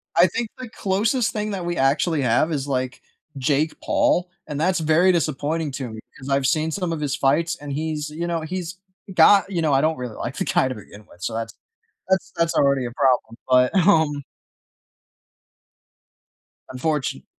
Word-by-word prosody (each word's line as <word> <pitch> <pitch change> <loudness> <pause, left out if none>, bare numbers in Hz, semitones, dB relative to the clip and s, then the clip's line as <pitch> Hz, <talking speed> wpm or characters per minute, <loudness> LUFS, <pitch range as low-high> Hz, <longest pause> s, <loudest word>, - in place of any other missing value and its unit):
I 175 +2 +6
think 225 +5 -3
the 255 -3 -8
closest 215 +5 0
thing 210 -1 -2
that 185 -3 -4
we 175 0 -2
actually 145 +3 +2
have 130 +6 +2
is, 145 -2 -2
like, 130 -1 -2 0.4
Jake 145 +4 +1
Paul, 180 0 +1 0.2
and 150 -1 -4
that's 180 +2 +1
very 160 +4 +4
disappointing 155 -2 -1
to 130 -3 -4
me, 110 0 -8 0.2
'cause 135 +1 -9
I've 135 -1 +2
seen 155 +3 +1
some 180 -1 -2
of 155 - -4
his 140 -2 -1
fights 160 +5 +1
and 145 -1 -7
he's, 155 0 -3
you 165 +3 -4
know 170 -1 -1
he's 180 +2 -5 0.4
got 195 +3 +6
You 175 - -1
know, 155 -3 +2
I 135 - +4
don't 160 -1 +1
really 125 -3 -6
like 120 +3 -5
the - - -1
guy 130 - +2
to 130 - -4
begin 105 0 -13
with, 90 - -19
so, - - -2
that's 115 0 -4 0.6
that's 190 0 +1
that's 165 0 +1
already 140 -2 +3
a 120 - -5
problem, 125 -4 +1
but, 125 +5 +4
um 155 -6 +3 2.5
Unfortun 135 - -2
155 Hz, 185 wpm, -22 LUFS, 135-170 Hz, 2.5 s, I